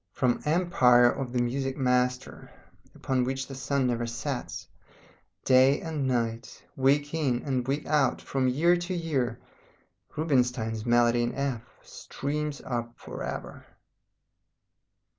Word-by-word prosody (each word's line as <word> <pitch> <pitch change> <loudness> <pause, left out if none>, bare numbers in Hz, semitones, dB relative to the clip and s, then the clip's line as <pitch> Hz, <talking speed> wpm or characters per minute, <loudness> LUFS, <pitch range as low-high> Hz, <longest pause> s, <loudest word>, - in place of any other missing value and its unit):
From 125 -3 +1
the - - -4
empire 125 -8 +4
of 135 -3 -5
the 125 - 0
music 135 +2 -2
master, 125 -1 0 0.5
upon 130 -2 0
which 135 +1 -2
the 135 - -9
sun 135 +1 -1
never 120 -1 -1
sets, 115 -1 -5 0.8
day 130 +2 +5
and 155 -5 -3
night, 115 -2 -3
week 145 +3 +2
in 130 -4 0
week 140 +3 -2
out, 145 -5 +2
from 135 -1 -1
year 160 +8 +3
to 175 +1 -4
year, 135 -9 -1 0.8
Rubinstein's 125 -7 0
Melody 120 0 +4
in 120 0 -2
F 135 -4 -2 0.2
streams 150 0 -5
up 120 -2 -3
for - - -9
ever. - - -6
130 Hz, 125 wpm, -27 LUFS, 120-145 Hz, 0.8 s, day